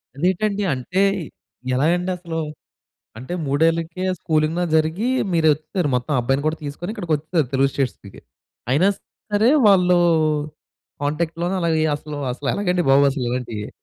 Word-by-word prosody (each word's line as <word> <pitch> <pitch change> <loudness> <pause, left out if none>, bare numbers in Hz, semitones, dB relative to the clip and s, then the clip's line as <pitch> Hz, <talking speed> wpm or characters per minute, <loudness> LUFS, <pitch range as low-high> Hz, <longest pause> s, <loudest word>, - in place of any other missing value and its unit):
అదేటండి? 195 +6 0
అంటే 135 +9 -1 0.7
ఎలాగండి 175 +7 +1
అసలు? 170 -2 -5 0.8
అంటే 130 +9 -6
మూడేళ్లకే 165 +5 0 0.2
స్కూలింగ్‌లో 160 +1 0
జరిగి 160 +8 +1 0.3
మీరొచ్చేసారు 155 +1 +1
మొత్తం 125 +4 -2
ఆ - - +3
అబ్బాయిని 135 +4 0
కూడా 155 +1 -1
తీసుకొని 150 +7 -5
ఇక్కడికొచిసారు 160 - -1
తెలుగు 135 +1 +3
స్టేట్స్‌కి. 125 -8 -4 0.5
అయినా 170 +9 +4 0.4
సరే 210 +3 +4 0.2
వాళ్ళు 180 -3 +5 1.1
కాంటాక్ట్‌లోనే 165 +4 -1
అలాగే 160 -2 +1
అసలు 150 0 -7 0.2
అసలేలాగండి 180 +6 -1
బాబు 140 +1 +6
అసలు 135 -2 -3
ఇలాంటియ్యి. 115 -4 -4
160 Hz, 115 wpm, -21 LUFS, 140-180 Hz, 1.1 s, బాబు